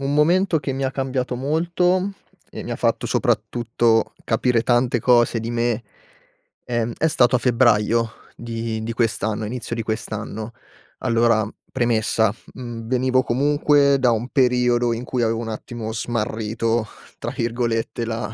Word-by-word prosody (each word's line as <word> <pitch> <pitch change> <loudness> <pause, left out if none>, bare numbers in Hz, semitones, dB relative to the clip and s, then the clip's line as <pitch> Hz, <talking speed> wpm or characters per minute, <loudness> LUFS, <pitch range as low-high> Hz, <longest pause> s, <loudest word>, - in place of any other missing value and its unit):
un 140 +1 -1
momento 170 +3 +3
che 135 0 -3
mi 135 +1 -2
ha 130 - 0
cambiato 130 -2 -2
molto, 175 +8 +1 0.4
e - - -7
mi - - -4
fatto - - 0
soprattutto 115 -1 +1
capire 120 0 +2
tante 120 0 +2
cose 120 -1 +3
di 115 +1 -4
me, 120 0 0 0.8
ehm, 120 -1 -1
è 160 - +2
stato 130 -4 +3
a - - +2
febbraio 115 -2 +3 0.3
di 115 -1 -4
di 115 +1 -3
quest'anno 110 -2 0
inizio 120 +1 -4
di 115 - -3
quest'anno. 110 0 -4 0.5
Allora, 115 -2 +2 0.2
premessa: 110 -3 +1 0.2
mhmm, 120 -3 -7
venivo 130 +1 +2
comunque 140 +2 +3
da 125 -2 +4
un 115 +2 -1
periodo 125 -3 +2
in 115 +1 -4
cui, 125 0 -2
avevo 115 0 +1
un 115 -1 -4
attimo 110 0 -5
"smarrito", 115 0 -1 0.3
tra - - -4
virgolette, 115 0 -2
la 115 -1 -4
120 Hz, 145 wpm, -22 LUFS, 115-130 Hz, 0.8 s, da